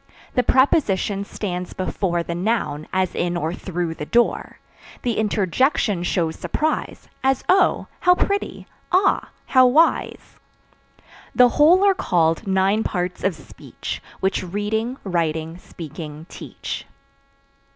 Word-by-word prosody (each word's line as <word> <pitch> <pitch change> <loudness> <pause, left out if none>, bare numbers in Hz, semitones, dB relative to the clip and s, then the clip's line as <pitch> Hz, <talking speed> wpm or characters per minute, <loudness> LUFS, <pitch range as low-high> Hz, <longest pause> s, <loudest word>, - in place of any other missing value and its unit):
The 250 - +3
Preposition 215 - +2
stands 180 -3 -5
before 180 -2 -1
The 170 - -4
noun, 175 -5 -1
as 185 -1 0
in 175 0 -1
or 165 0 -2
through 175 -3 -3
the 150 - -6
door. 240 0 +1 0.5
The 235 -3 0
Interjection 210 - +1
shows 170 -2 -1
surprise 310 +1 -2 0.2
As 265 -1 +2
Oh! 375 +1 +3
how 360 0 +5
pretty, 400 +2 -2 0.3
Ah! 370 +2 +2 0.2
how 255 -1 +5
wise. 310 +7 +1 1.0
The 250 -1 +7
whole 325 +9 +5
are 395 - +5
called 170 - +1
nine 195 +3 +2
parts 180 -1 -3
of 190 -3 +1
speech, 150 - -8 0.2
Which 190 +1 +1
reading, 210 +6 -2
writing, 165 -2 -2
speaking 155 -2 -9
teach. - - -7
190 Hz, 120 wpm, -22 LUFS, 170-250 Hz, 1.0 s, The